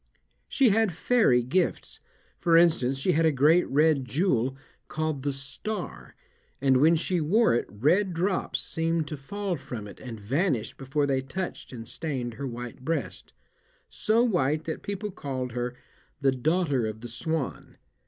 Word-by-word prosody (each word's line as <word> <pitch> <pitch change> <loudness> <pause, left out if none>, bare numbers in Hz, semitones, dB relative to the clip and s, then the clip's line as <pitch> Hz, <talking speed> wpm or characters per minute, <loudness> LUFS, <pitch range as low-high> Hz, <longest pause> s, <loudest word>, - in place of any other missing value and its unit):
She 270 -4 +3
had 215 -2 +2
fairy 165 - +3
gifts; 175 +10 -1 0.4
for 165 -2 +4
instance, 155 -6 +3
she 135 +7 +1
had 165 0 +2
a - - +4
great 155 +6 +4
red 150 0 +3
jewel, 130 - 0 0.3
called 155 -3 -2
"the 140 +1 -1
Star," 135 +10 -6 0.4
and 135 -1 +4
when 160 +5 +5
she 175 +1 0
wore 205 - +3
it 120 - 0
red 155 - +2
drops 180 +3 -1
seemed 165 -1 -1
to 150 - -4
fall 190 +6 -4
from 125 -6 -7
it 100 - -12
and 115 -4 -8
vanished 125 - -1
before 135 +2 -1
they 135 -2 +1
touched 180 +8 -5
and 115 -3 -8
stained 130 -7 -4
her 140 +4 -5
white 120 0 -7
breast 160 -1 -3 0.6
so 225 +2 +2
white 155 - +1
that 160 0 -4
people 205 +1 -4
called 130 -6 -4
her 125 +1 -3 0.4
"the 135 -1 +3
Daughter 140 -2 +1
of 110 0 -6
the 120 - -6
Swan." 150 +5 -4
145 Hz, 160 wpm, -27 LUFS, 130-175 Hz, 0.6 s, when